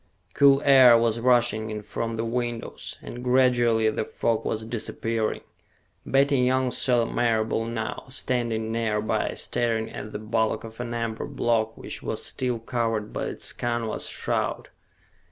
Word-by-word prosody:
Cool 140 0 +5
air 130 -4 +8
was 115 0 +1
rushing 120 -3 +2
in 105 -1 -5
from 115 +2 -3
the 115 +1 -2
windows, 120 0 -4
and 120 +1 -8
gradually 120 -3 +3
the - - -2
fog 115 +1 -1
was 110 0 -3
disappearing. 115 -1 -2 0.7
Betty 140 0 +3
Young 130 0 +2
saw 120 -2 +2
Marable 115 -1 0
now, 115 -1 -4
standing 120 -4 -1
nearby, 110 -2 -1
staring 115 -2 -1
at 105 +1 -7
the - - -4
bulk 110 +1 -1
of 115 0 -10
an 120 -1 -4
amber 115 -1 -3
block 110 -2 0
which - - -6
was - - -3
still 125 -2 0
covered 115 -2 -2
by - - -2
its - - -4
canvas 120 -2 -2
shroud. - - -2
115 Hz, 145 wpm, -25 LUFS, 110-120 Hz, 0.7 s, air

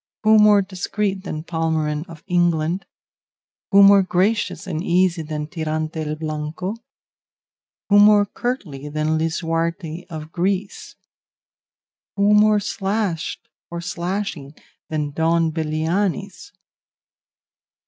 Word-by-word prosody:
Who 215 0 +6
more 210 -1 +6
discreet 195 +1 -3
than 155 -3 -5
Palmerin 160 -2 -1
of 165 -2 -12
England? 175 -1 0 0.8
Who 200 0 +7
more 200 0 +8
gracious 190 +4 0
and 160 -2 -3
easy 175 -1 +2
than 150 -1 -4
Tirante 155 0 -3
el 155 0 -3
Blanco? 155 +4 -4 1.2
Who 205 0 +6
more 205 0 +6
courtly 185 - -4
than 155 +1 0
Lisuarte 165 +1 -2
of 155 -1 -8
Greece? 190 +3 -2 1.2
Who 205 +1 +3
more 210 0 +5
slashed 195 -4 -3 0.2
or 170 - -5
slashing 170 -4 -4 0.3
than 150 -2 -2
Don 165 +2 +1
Belianis? 170 +5 -2
170 Hz, 105 wpm, -21 LUFS, 155-200 Hz, 1.2 s, more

